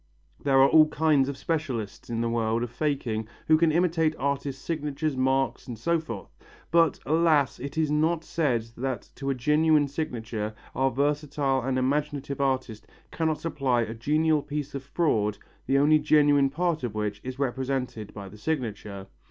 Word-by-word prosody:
There 135 -2 +4
are 135 - +7
all 155 +1 +6
kinds 150 -3 +2
of 140 - -5
specialists 130 -14 -3
in 115 -1 -1
the 115 - 0
world 115 0 0
of 120 - -5
faking 120 -6 -2 0.2
who 155 - +6
can 160 0 +3
imitate 165 -1 +2
artists' 140 0 -2
signatures, 150 -1 -2
marks 130 +1 0
and 120 -3 -6
so 170 +9 +1
forth, 115 -11 -8 0.4
but, 165 -2 +4
alas, 155 -3 +2
it 140 +4 -6
is 155 -2 +1
not 160 +2 +1
said 140 -11 0
that 130 -3 -3
to 140 - -4
a 135 - +1
genuine 150 +3 +3
signature 115 -7 -4 0.2
our 135 0 +2
versatile 140 0 0
and 130 +1 -1
imaginative 140 +1 -1
artist 130 -5 -1 0.2
cannot 160 -2 -1
supply 135 -7 0
a 115 - -5
genial 150 +6 +1
piece 145 -1 -5
of 140 - -4
fraud 110 - 0 0.3
the 135 - +3
only 150 +2 +5
genuine 145 -2 +4
part 165 +1 -1
of 120 -4 -4
which 105 -1 -3
is 130 0 -6
represented 130 -4 -2
by 100 -2 -8
the 105 +2 -13
signature. 105 -8 -3
140 Hz, 170 wpm, -27 LUFS, 120-155 Hz, 0.4 s, are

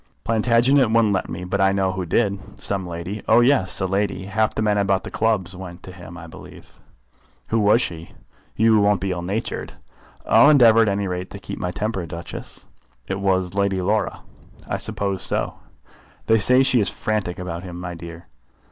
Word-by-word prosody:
"Plantagenet 120 +3 +3
wouldn't 110 -2 +3
let 95 - -2
me, 90 - -6
but 95 +2 -2
I 95 0 +4
know 95 -1 +1
who 95 -2 -4
did." 100 -1 -1
"Some 95 -2 -2
lady?" 85 +5 -6
"Oh, - - +6
yes, 120 -7 +3
a 95 - 0
lady. 95 0 -1
Half 110 +2 0
the 110 - -1
men 105 -1 +2
about 100 -1 +1
the - - -8
clubs 100 -5 0
went 90 -2 -9
to 95 - -9
him, 90 -2 -11
I 85 - -9
believe." 80 - -14 0.7
"Who 115 - +1
was 105 +3 +4
she?" 85 -1 -6 0.5
"You 110 0 +4
won't 100 -1 +3
be 95 +1 -2
ill 90 -1 -3
natured?" 100 +6 -4 0.5
"I'll 145 - +6
endeavour 115 -6 +6
at 110 - +3
any 100 0 -1
rate 90 0 -4
to - - -8
keep - - -7
my 90 - -2
temper, 100 +1 -3
Duchess." 85 0 -8 0.4
"It 95 0 -3
was 95 -2 0
Lady 100 -1 0
Laura." 105 +3 -1 0.5
"I - - -2
supposed 100 -2 -3
so." - - -2 0.7
"They 110 0 +4
say 125 +5 +5
she 130 -2 +3
is 100 - +1
frantic 105 -5 -3
about 85 -2 -5
him, 90 -1 -8
my 90 0 -5
dear." 85 0 -10
100 Hz, 190 wpm, -22 LUFS, 90-110 Hz, 0.7 s, Oh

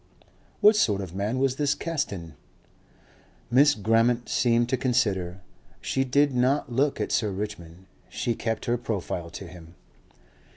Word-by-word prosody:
"What 210 +1 +7
sort 105 - +2
of 90 -3 -7
man 105 +6 -2
was 130 0 +1
this 145 -1 +1
Caston?" 100 - -4 1.2
Miss 145 +4 +5
Grammont 115 +3 +1
seemed 120 -1 +2
to 130 - +2
consider. 100 -8 0 0.4
She 135 - -1
did 140 +2 +2
not 130 +2 +1
look 140 +3 +1
at - - -2
Sir 110 - +1
Richmond; 95 -3 -7 0.2
she 120 -1 -2
kept 115 -1 -3
her 120 0 0
profile 90 -6 -4
to 95 - -8
him. 85 -1 -13
115 Hz, 140 wpm, -26 LUFS, 95-130 Hz, 1.2 s, What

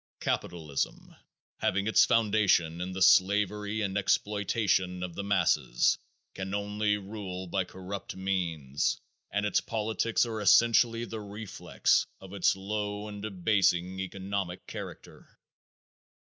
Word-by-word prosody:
Capitalism, 80 -5 -3 0.4
having 100 +2 0
its 110 - +5
foundation 100 -7 +2
in 90 +1 -3
the 95 0 +1
slavery 105 +3 +3
and 95 -2 -2
exploitation 100 -2 +1
of 90 -2 -5
the 100 - -5
masses, 95 -10 +2 0.3
can 95 +1 -4
only 105 0 0
rule 95 -2 -6
by 95 +1 -1
corrupt 95 +1 -7
means 85 -8 -1 0.3
and 105 +1 -1
its 105 - +2
politics 110 +1 0
are 110 -2 -4
essentially 115 +2 +4
the 110 -2 -6
reflex 105 0 0
of 95 0 -12
its 100 -2 +2
low 105 +1 -3
and 105 -1 -7
debasing 95 -2 +1
economic 95 -1 -4
character. - - -10
100 Hz, 120 wpm, -29 LUFS, 95-105 Hz, 0.4 s, its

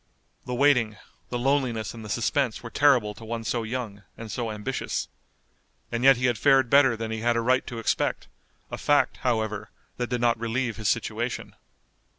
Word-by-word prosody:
The 125 - -3
waiting, 125 -6 +3 0.3
the 120 - -2
loneliness 120 -4 0
and 115 -1 -9
the 105 - -8
suspense 120 +2 0
were 115 - -8
terrible 125 -8 +3
to 105 - -13
one 115 0 -4
so 115 +1 -1
young, 110 -3 -5 0.2
and 115 -2 -7
so 120 -2 -3
ambitious. 110 +5 -3 0.8
And 120 +1 -2
yet 135 -2 +7
he 125 - -1
had 120 -4 +1
fared 135 -2 +4
better 135 -4 +5
than 110 0 -4
he 110 - -3
had 120 +1 +1
a - - +2
right 130 +2 +1
to 120 - -6
expect, 115 - -1 0.4
a - - -5
fact, 145 0 +2
however, 110 -3 -1 0.3
that 120 -1 -2
did 125 -1 -1
not 120 -1 +2
relieve 115 0 -2
his 110 -2 0
situation. - - -2
120 Hz, 185 wpm, -26 LUFS, 110-130 Hz, 0.8 s, yet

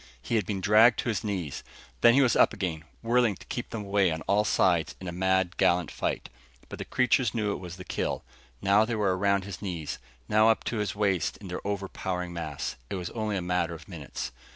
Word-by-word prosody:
He 65 - -5
had 110 -5 +1
been 100 -3 -2
dragged 110 +5 +6
to - - -3
his 110 +1 -1
knees. 95 -9 -3 0.4
Then 120 0 +7
he 140 - +6
was 125 - +3
up - - +5
again, 80 -4 -3 0.2
whirling 120 -2 +3
to - - -14
keep 120 - -5
them 110 -3 -5
away 100 -2 +3
on 80 0 -3
all 105 +1 +2
sides 85 -5 +2
in 95 - -7
a - - -3
mad, 95 +1 +1
gallant 85 -2 +2
fight. - - -2 0.4
But - - -8
the - - -4
creatures 125 -2 +2
knew 105 -3 0
it - - -3
was 90 -1 -8
the 90 - -9
kill. - - -2 0.4
Now 100 +2 +5
they 115 +1 -1
were 100 -4 +1
around 100 0 +2
his 100 -1 -7
knees, 85 -7 -4 0.3
now 110 +1 +5
up 110 - +2
to 115 - -2
his 105 -1 -2
waist 100 -4 0
in 100 - -10
their 90 - -4
overpowering 95 -3 -3
mass. 80 -4 -4
It - - -3
was 90 -2 -4
only 110 -3 -2
a 90 - -3
matter 90 -1 0
of 80 -2 -13
minutes. 80 -10 -6
100 Hz, 225 wpm, -28 LUFS, 90-105 Hz, 0.4 s, Then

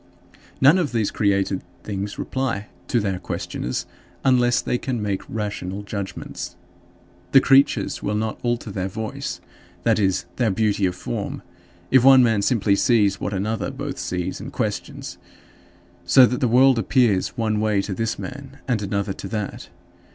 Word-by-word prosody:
None 145 +8 +6
of 150 -8 -1
these 110 -3 +1
created 100 -2 +1 0.2
things 100 0 -4
reply 115 -6 -2 0.2
to 120 - +2
their 95 -4 -1
questioners 65 -7 -4 0.4
unless 125 -2 +4
they 125 - -1
can 130 -4 -2
make 100 -2 -2
rational 105 -2 -4
judgments. 100 -3 -6 0.8
The 135 - +9
creatures 135 +1 +3
will 105 - -1
not 110 +1 -2
alter 120 -3 -2
their 95 -1 -2
voice 110 +3 -5 0.4
that 115 -2 +3
is, 95 -3 +1
their 120 -3 +2
beauty 100 -1 +1
of 90 - -3
form - - -5 0.5
if 130 -2 +6
one 135 -1 +8
man 115 -4 +2
simply 100 -2 +2
sees 100 -2 +2
what - - -2
another 105 +5 -2
both 140 +1 -5
sees 90 -1 -3
and - - -7
questions, - - -4 0.8
so 130 -2 +7
that 125 +1 -1
the 125 - +2
world 125 +1 +5
appears 115 -3 +2
one 110 -2 0
way 105 -2 +1
to 100 - -4
this 115 +3 -2
man 135 +1 -8
and 120 -5 0
another 100 0 -2
to - - -7
that. 105 -3 -5
110 Hz, 160 wpm, -23 LUFS, 100-125 Hz, 0.8 s, The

